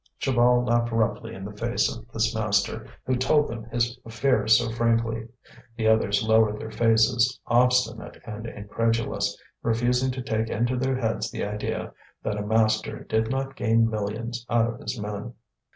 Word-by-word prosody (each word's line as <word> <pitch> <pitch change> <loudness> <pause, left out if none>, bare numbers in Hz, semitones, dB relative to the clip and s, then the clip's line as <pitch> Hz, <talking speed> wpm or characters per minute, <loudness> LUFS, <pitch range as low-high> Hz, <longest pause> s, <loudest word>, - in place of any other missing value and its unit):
Chaval 125 -1 +3
laughed 120 0 +2
roughly 115 0 -1
in 95 - -8
the 105 - -7
face 120 +3 0
of 115 - -12
this 115 -1 0
master 110 0 0 0.2
who 130 - +1
told 145 +4 +3
them 115 -1 -6
his 120 +1 -1
affairs 115 0 +3
so 120 -2 -1
frankly. 115 -1 0 0.5
The 110 -1 +1
others 105 -2 +3
lowered 110 -1 +3
their 110 - -7
faces, 115 +2 +3
obstinate 125 +1 +2
and 110 0 -6
incredulous, 105 -1 -1 0.2
refusing 120 +3 +1
to 130 -1 -5
take 110 -1 -1
into 120 +3 0
their 130 +1 0
heads 115 -2 -1
the - - -3
idea 105 +1 -4 0.3
that 105 -1 -2
a - - -2
master 110 0 +1
did 110 0 0
not 135 +1 -2
gain 115 -2 +3
millions 110 +3 -3
out 115 -1 +3
of 120 - -12
his 130 -4 -5
men. 105 +3 -5
115 Hz, 165 wpm, -25 LUFS, 110-120 Hz, 0.5 s, Chaval